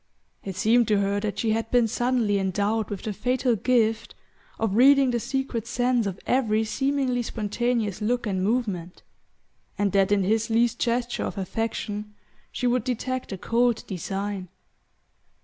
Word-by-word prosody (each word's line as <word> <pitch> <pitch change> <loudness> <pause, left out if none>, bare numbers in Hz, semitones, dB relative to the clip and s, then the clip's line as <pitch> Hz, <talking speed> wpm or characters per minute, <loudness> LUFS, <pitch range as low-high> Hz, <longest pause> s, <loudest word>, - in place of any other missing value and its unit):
It 190 -2 -5
seemed 225 +4 +3
to 210 - +3
her 200 0 0
that 205 -1 -3
she 220 +2 0
had 225 +1 -1
been 245 -2 +3
suddenly 240 -3 +1
endowed 205 +3 0
with 200 -2 -5
the 215 - -3
fatal 250 +4 +1
gift 225 0 +1 0.4
of 220 -3 -1
reading 270 +2 +6
the 240 - 0
secret 265 -3 -3
sense 245 -2 +1
of 195 -1 -5
every 225 -4 +2
seemingly 270 +1 0
spontaneous 225 -1 -2
look 240 +3 0
and 190 -3 -1
movement, 200 -6 -2 0.7
and 205 -1 +1
that 195 0 +2
in 200 -1 +3
his 220 +4 +1
least 235 +1 +2
gesture 240 0 -1
of - - -5
affection 210 +1 -3 0.4
she - - -3
would 245 -1 +2
detect 255 +1 -3
a 195 - -4
cold 235 +4 +1
design. 195 +1 -4
225 Hz, 155 wpm, -25 LUFS, 205-245 Hz, 0.7 s, reading